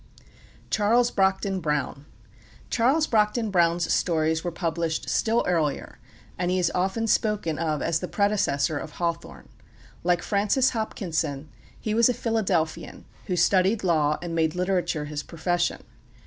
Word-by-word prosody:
CHARLES 235 +3 +3
BROCKDEN 195 0 +1
BROWN 150 -3 -2 0.6
Charles 270 +7 +3
Brockden 220 -2 +1
Brown's 170 -1 +2
stories 160 -1 +1
were 175 - -2
published 165 -1 -2
still 230 +1 +1
earlier; 160 -5 -1 0.4
and 175 -1 0
he 185 - +1
is 180 -2 +1
often 190 +5 0
spoken 210 -8 0
of 155 -3 -1
as 165 -1 +1
the 180 - -4
predecessor 175 -8 +1
of 155 - -8
Hawthorne. 170 -1 -4 0.5
Like 175 0 +1
Francis 215 +6 +2
Hopkinson, 160 - -3 0.3
he 215 - -2
was 230 +2 +4
a 250 - 0
Philadelphian, 195 -10 -1 0.2
who 180 - -1
studied 190 +4 +2
law 155 -4 +2
and 170 -1 -4
made 160 -1 +1
literature 180 -4 -1
his 150 0 -4
profession. 175 +2 -2
175 Hz, 135 wpm, -25 LUFS, 160-210 Hz, 0.6 s, was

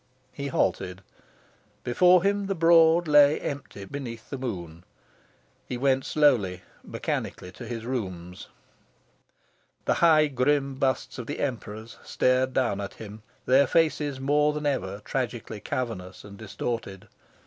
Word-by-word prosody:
He 140 -1 -5
halted. 95 -5 -1 0.8
Before 180 +8 +4
him, 200 0 +1
the 195 - -1
Broad 165 0 +5
lay 145 0 +6
empty 140 -8 -6
beneath 115 -1 -7
the 135 - -3
moon. 85 -9 -6 0.8
He 125 - -4
went 135 +1 +1
slowly, 105 -12 +2 0.2
mechanically, 90 - -4
to 115 +6 -10
his 115 -1 -5
rooms. 95 -8 -5 1.4
The - - +3
high 160 -2 +6
grim 140 0 +1
busts 130 -1 -1
of 120 - -6
the 145 - -5
Emperors 110 -4 -5
stared 130 +1 +1
down 120 -7 0
at 100 - -6
him, 110 0 -10 0.2
their 135 +2 +5
faces 150 -4 +1
more 150 +2 +2
than 150 0 -4
ever 100 -8 -2
tragically 120 -4 -3
cavernous 100 -7 -5
and 100 -1 -11
distorted. 110 -1 -5
130 Hz, 130 wpm, -26 LUFS, 105-145 Hz, 1.4 s, lay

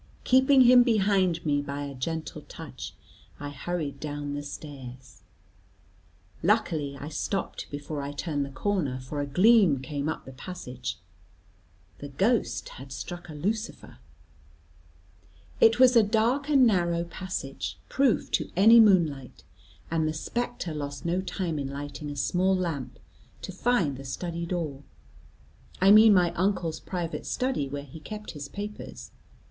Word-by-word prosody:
Keeping 260 +1 +5
him 250 0 +8
behind 195 -7 +2
me 145 -1 +2
by 145 0 -5
a 140 -1 -6
gentle 160 +5 -4
touch, - - -8 0.4
I 145 - -5
hurried 145 -1 -4
down 145 -1 -4
the 145 - -3
stairs. 130 -4 -10 1.2
Luckily, 160 -8 +1
I 145 - -6
stopped 180 +4 -3
before 145 +1 -5
I 140 +1 -4
turned 145 0 -2
the 140 - -5
corner, 140 -3 -1
for 135 +3 -5
a 145 - -3
gleam 185 - +5
came 140 +3 -3
up 160 - -4
the 130 - -9
passage; 130 -5 -6 1.0
the 145 - -6
ghost 140 - 0
had 135 +1 -11
struck 175 +5 -7
a 155 - -8
lucifer. 210 +9 -4 1.6
It 225 +1 +6
was 255 -1 +7
a 230 - +8
dark 230 +7 +1
and 275 -4 +6
narrow 170 -6 +2
passage, 170 -6 -5
proof 270 -4 +1
to - - 0
any 220 +6 +8
moon 195 -6 +7
light, 135 -4 -10 0.5
and 160 -1 +1
the 155 - -1
spectre 240 +1 -3
lost 145 -1 -5
no 175 +2 +1
time 175 -4 -3
in 140 - -3
lighting 145 +2 -6
a 145 - -5
small 185 +6 +1
lamp, 165 -8 -3 0.5
to - - -5
find 190 - +1
the 135 - -8
study 170 +4 -4
door; 160 -6 -3 1.0
I 195 +2 +6
mean 215 0 +8
my 175 -2 +4
uncle's 175 -3 0
private 175 -2 -4
study, 250 - -1
where 140 +1 -5
he 145 +3 -11
kept 210 +6 -7
his 145 -2 -7
papers. 205 +5 -8
165 Hz, 150 wpm, -27 LUFS, 145-205 Hz, 1.6 s, him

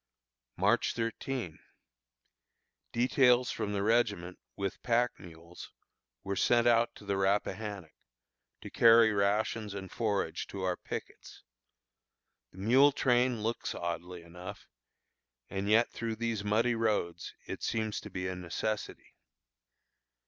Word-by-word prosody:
March 105 +7 +2
13. 115 -5 -3 1.3
Details 125 0 +3
from 105 -2 -3
the 100 -1 -1
regiment, 105 -6 +1 0.2
with 100 -2 -4
pack 120 0 +2
mules, 85 0 -12 0.5
were 100 0 -3
sent 120 +4 +3
out 120 0 +3
to 105 - -13
the 100 -1 -1
Rappahannock, 100 -2 -1 0.7
to - - -9
carry 115 -1 +6
rations 105 +1 0
and 95 -1 -7
forage 105 -4 -1
to 95 -1 -6
our 90 -1 0
pickets. - - -8 1.1
The - - -18
mule 130 +9 +5
train 125 -4 +2
looks 115 +2 -2
oddly 85 +1 -5
enough, 90 +2 -10 0.8
and 100 +1 -2
yet 115 +2 +4
through 115 -1 -4
these 115 -2 -2
muddy 110 +4 +2
roads 105 -7 -1
it - - -6
seems 110 -1 -1
to - - -9
be 90 0 -4
a 95 - -3
necessity. 90 +4 -4
105 Hz, 120 wpm, -31 LUFS, 95-115 Hz, 1.3 s, carry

